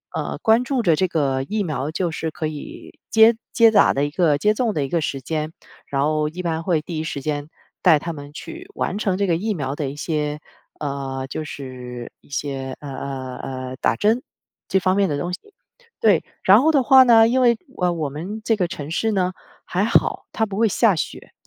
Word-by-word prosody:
呃， - - -3
关 225 +2 +4
注 260 -1 0
着 165 -4 +4
这 185 - +1
个 135 -5 0
疫 210 +9 -2
苗， 150 -4 -3
就 175 +2 -1
是 160 0 -3
可 155 0 -3
以 150 -2 -9
接 225 +1 +6 0.2
接 230 -2 +6
打 - - +5
的 140 +1 +1
一 145 - -4
个 155 -4 +2
接 210 +8 +2
种 225 -1 0
的 145 -2 0
一 - - -7
个 170 +2 0
时 140 -2 -2
间， 155 +1 -3 0.4
然 140 0 0
后 150 0 +1
一 175 +4 -6
般 165 -1 -2
会 165 -3 +1
第 160 +1 -6
一 - - -2
时 145 -3 -4
间 145 +1 -3 0.3
带 160 -5 +6
他 170 +2 -4
们 145 -1 -10
去 345 - -9
完 190 - -2
成 190 -4 0
这 200 - +1
个 170 - +2
疫 215 +4 -1
苗 140 -6 -3
的 145 -2 -2
一 140 - -7
些 150 -1 -2 0.4
呃， 135 -2 -3
就 155 - -4
是 125 -4 -8
一 - - -24
些， 135 -2 -4
呃 145 - -7
呃 130 -2 -5
呃， 130 -1 -6
打 - - +1
针， 225 +4 +2 0.5
这 190 - +2
方 185 0 +1
面 200 -3 +2
的 145 - -1
东 175 +4 -3
西。 - - -4 0.6
对， 205 -7 +4 0.2
然 205 +6 +7
后 320 +2 +4
的 275 -4 +3
话 265 0 +8
呢， 225 -3 +6
因 255 +3 +2
为， 240 -2 +4 0.2
呃， 180 -1 +3
我 155 -4 -2
们 180 +10 -6
这 225 - +2
个 185 -4 0
城 150 -2 -7
市 220 +6 0
呢 185 -2 0 0.3
还 185 +3 0
好， 230 - +1
它 220 - +1
不 200 -2 -6
会 225 +1 +4
下 210 -1 +3
雪。 - - -5
160 Hz, 240 characters per minute, -22 LUFS, 145-210 Hz, 0.6 s, 话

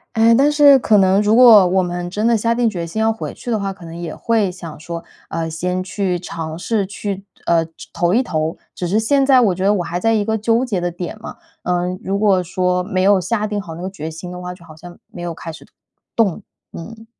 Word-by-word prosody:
诶， 225 +1 +5
但 280 +4 +4
是 290 -2 +7
可 220 -3 +3
能 190 0 +4
如 210 +1 +3
果 230 -6 +8
我 185 +1 +2
们 175 0 -4
真 210 +4 -2
的 235 0 +4
下 230 +2 +1
定 240 -1 +2
决 175 -5 -4
心 170 +6 -5
要 220 0 +2
回 220 - -6
去 245 - -7
的 220 - +1
话， 200 -1 -2
可 185 -3 -12
能 165 0 -9
也 170 -2 -6
会 220 -5 0
想 170 -4 -10
说， 170 +1 -6 0.3
呃， 165 0 -3
先 180 +3 -2
去 185 -2 -2
尝 165 -2 -6
试 205 +3 -1
去， 200 -1 -5 0.2
呃 170 -1 +3
就 165 - -13 0.2
投 175 0 +1
一 245 +5 +3
投， 160 -6 -2 0.2
只 180 - -4
是 200 +5 +2
现 275 +5 +2
在 265 -1 +5
我 215 -7 +3
觉 185 - -4
得 200 +2 +4
我 180 - -1
还 175 +1 -3
在 225 +4 +2
一 210 -2 +1
个 220 +1 0
纠 230 +3 +1
结 205 -8 -2
的 175 - -1
点 175 +3 -6
嘛。 - - -8 0.3
嗯， 180 +1 -1
如 195 +1 -1
果 200 -3 +3
说 180 +1 -1
没 185 0 -1
有 195 -1 +4
下 210 +4 -1
定 210 -1 -3
好 165 -4 -9
那 170 - -8
个 185 - -3
决 160 -5 -6
心 165 +3 -8
的 180 0 -8
话， 180 0 -6
就 170 - -17
好 155 -2 -13
像 175 +2 -12
没 175 - -9
有 175 -1 -4
开 165 - -7
始 155 - -13 0.5
动， 220 -4 +1 0.3
嗯。 225 +6 -9
185 Hz, 270 characters per minute, -19 LUFS, 175-220 Hz, 0.5 s, 果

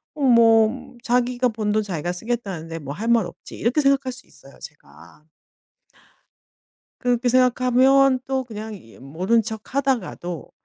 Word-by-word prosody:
어 295 - -7
뭐 235 0 +3
'자기가 250 +1 +1
번 215 -2 -2
돈 215 +1 +2
자기가 175 -4 -3
쓰겠다는데 180 -5 -5
뭐 140 -2 -7
할 215 +8 -5
말 235 -4 +3
없지.' - - -11
이렇게 240 +7 0
생각할 275 -2 +2
수 255 +1 -13
있어요 135 0 -18
제가. 80 - -15 1.8
그렇게 245 0 +1
생각하면 255 +1 +3
또 265 -1 -1
그냥 220 -2 -8
이 140 - -15
모른 180 - 0
척 220 +2 -8
하다가도 230 - -2
230 Hz, 280 characters per minute, -22 LUFS, 185-255 Hz, 1.8 s, 뭐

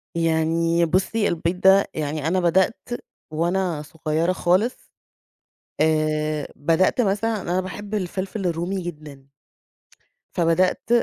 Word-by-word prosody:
يعني 165 +1 +2
بُصي 190 +6 +1
البيض 170 +1 -1
ده، 195 +1 +6
يعني 150 0 -2
أنا 185 +3 +2
بدأت 185 +5 +3 0.6
وأنا 170 0 0
صُغيرة 155 +3 -1
خالص 185 +7 0 0.9
آآ، 155 -1 +1
بدأت 165 - +2
مثلًا 215 0 0
أنا 180 0 -1
باحب 200 +3 -6
الفلفل 195 0 -3
الرومي 175 +3 -1
جدًا. 150 -5 -9 1.1
فبدأت 175 +4 +1
170 Hz, 105 wpm, -23 LUFS, 160-190 Hz, 1.1 s, ده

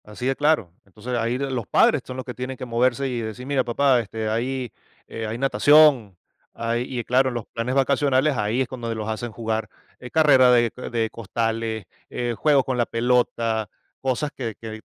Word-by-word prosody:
Así 105 +4 -7
de 135 +1 +1
claro. 145 - +1
Entonces, 105 +6 -6
ahí 115 +2 0
los 130 -5 -3
padres 150 - +4
son 130 - -7
los 130 - -5
que 125 - -6
tienen 125 +1 -6
que 130 - -6
moverse 125 +3 +1
y 125 -2 -3
decir: 110 +3 -6
"Mira, 135 -1 +1
papá, 130 +1 +2
este, 110 -1 -4
hay, 125 +2 -2 0.4
eh, 115 -1 -5
hay 110 +2 -4
natación", 135 - +4 0.4
hay, 115 +1 -2 0.2
y, - - -2
claro, 130 +2 +2
los 120 -3 -5
planes 120 +3 -3
vacacionales 140 +1 +2
ahí 110 +3 0
es 130 - 0
cuando 120 -3 -5
los 110 -1 -4
hacen 110 +2 -4
jugar, 110 0 -3 0.3
eh, 125 - -9
carrera 135 -5 +5
de 120 -2 +4
co 125 - -8
de 115 -2 -1
costales, 115 -1 -3 0.2
eh, 120 -1 -2
juegos 140 0 +3
con 130 -1 -2
la 120 - +2
pelota, 115 -2 0 0.3
cosas 135 +3 -1
que 115 -5 -4
que 110 -1 -8
120 Hz, 195 wpm, -23 LUFS, 115-130 Hz, 0.4 s, carrera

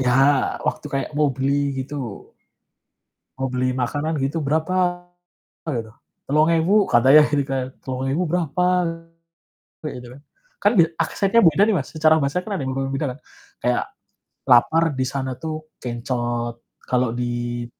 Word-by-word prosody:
Ya 125 -1 +2 0.6
waktu - - -3
kayak 135 +2 -2
mau 150 -1 +3
beli 140 +2 0
gitu. 130 -8 -7 1.1
Mau 135 0 -1
beli 130 0 +1
makanan 145 +5 -1
gitu 140 +4 -1
"Berapa?" 175 +4 0 0.6
Gitu, 115 -6 -3 0.3
"Telung 150 +3 +3
ewu." 175 +5 +3
Katanya 130 +5 +7
gitu 145 -2 +1
kan, 135 -1 -2 0.2
Rp3.000 135 +6 -2
berapa 175 0 0 1.2
kayak 155 - -5
gitu 125 - -11
kan, 140 - -14 0.4
kan 205 - +5
bia 165 -2 +6
aksennya 195 +6 +2
beda 165 +4 +4
nih 220 - +2
Mas, 135 - -5
secara 155 0 +4
bahasa 140 +5 0
kan 210 - -4
ada - - -4
yang 130 - -2
berbeda 135 +2 -2
kan - - -16 0.4
kayak, - - +1 0.6
lapar 160 +7 +5
di - - +1
sana 130 -1 -3
tuh 155 +2 -7
kencot 120 -1 -3 0.3
kalau 125 -1 +1
di 120 0 -3
140 Hz, 145 wpm, -22 LUFS, 125-160 Hz, 1.2 s, Katanya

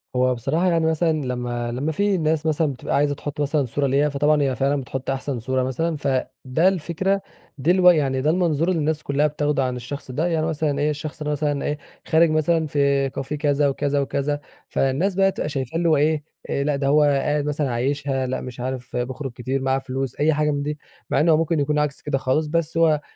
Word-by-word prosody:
هو 125 0 +2
بصراحة 155 +10 0
يعني 165 -1 +2
مثلًا 160 +1 +2
لما 120 -1 -3
لما 135 +6 -2
في 200 +4 +1
ناس 160 -1 0
مثلًا 155 -2 +1
بتبقى 125 - -3
عايزة 145 0 +2
تُحط 145 +1 -5
مثلًا 145 0 +1
صورة 140 +4 -1
ليها، 140 +3 +2
فطبعًا 145 +1 +2
هي 135 -2 +1
فعلًا 140 +1 +1
بتحط 130 +1 -5
أحسن 135 -1 -2
صورة 130 +3 0
مثلًا، 155 +6 -1
فده 135 +3 0
الفكرة 190 +2 0 0.4
دي 150 +5 +2
الو 180 -1 +6
يعني 140 -6 +2
ده 150 - +2
المنظور 165 -2 +1
اللي 180 -3 +1
الناس 155 0 -1
كلها 140 +2 +2
بتاخدوا 145 -2 0
عن 125 -1 -1
الشخص 130 +2 -6
ده، 155 +7 0
يعني 160 -2 0
مثلًا 155 -3 -1
إيه، 150 +1 +2
الشخص 150 +1 -5
مثلًا 145 -1 -1
إيه، 150 - -1 0.3
خارج 165 +1 +4
مثلًا 155 +1 +1
في 140 -1 +2
كافيه 135 +2 -4
كذا 145 -1 +2
وكذا 140 +1 0
وكذا 140 +1 -1 0.3
فالناس 150 +9 0
بقى 195 0 +4
تبقى 150 - -3
شايفاه 135 +1 -3
اللي 170 0 +2
هو 155 - +4
إيه، 150 +1 +1 0.4
لأ 145 0 +1
ده 140 0 -1
هو 150 +2 +5
قاعد 145 0 +1
مثلًا 150 -2 -1
عايشها، 135 +2 -1
لأ 130 - -2
مش 125 -1 -8
عارف 130 0 -5
بيخرج 130 +2 -3
كتير 130 +3 -3
معاه 135 0 +1
فلوس 135 -1 -4
أي 155 +2 +3
حاجة 150 0 +1
من 145 -1 -2
دي، 150 +1 -3 0.3
مع - - +2
إن 160 - +3
هو 155 - +6
ممكن 165 0 +1
يكون 150 +1 +1
عكس 150 -1 -1
كده 145 -2 -1
خالص، 135 +4 0
بس 165 +1 -1
هو 155 -3 +4
145 Hz, 215 wpm, -23 LUFS, 135-155 Hz, 0.4 s, الو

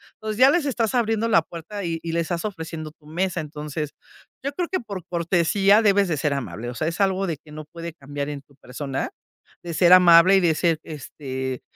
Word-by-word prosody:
Entonces 215 -1 -5
ya 260 +3 +7
les 330 -1 +1
estás 235 -5 0
abriendo 225 -2 +1
la 190 -7 +5
puerta 170 +5 -8
y 165 -1 -2
y 165 - -3
les 170 0 0
estás 170 +3 -3
ofreciendo 160 -5 -6
tu 150 -1 -28
mesa. 180 +3 -2
Entonces, 150 -1 -5 0.5
yo 280 - -2
creo 345 +4 -3
que 375 - -1
por 200 -6 -7
cortesía 180 +4 +3
debes 200 -2 +3
de 160 -3 -1
ser 145 0 0
amable, 120 -3 -5
o 125 - -7
sea, 155 - -2
es 165 +3 -3
algo 195 0 +2
de 165 -3 -2
que 150 - -18
no 155 0 -8
puede 170 +1 -8
cambiar 145 -1 -6
en 145 -1 -6
tu 140 0 -26
persona, 135 +1 -5 0.6
de 170 -1 -5
ser 175 +2 +5
amable 180 +1 +8
y - - +5
de 170 -3 +3
ser, 165 0 +1
este, 130 -4 -6
170 Hz, 220 wpm, -23 LUFS, 150-195 Hz, 0.6 s, amable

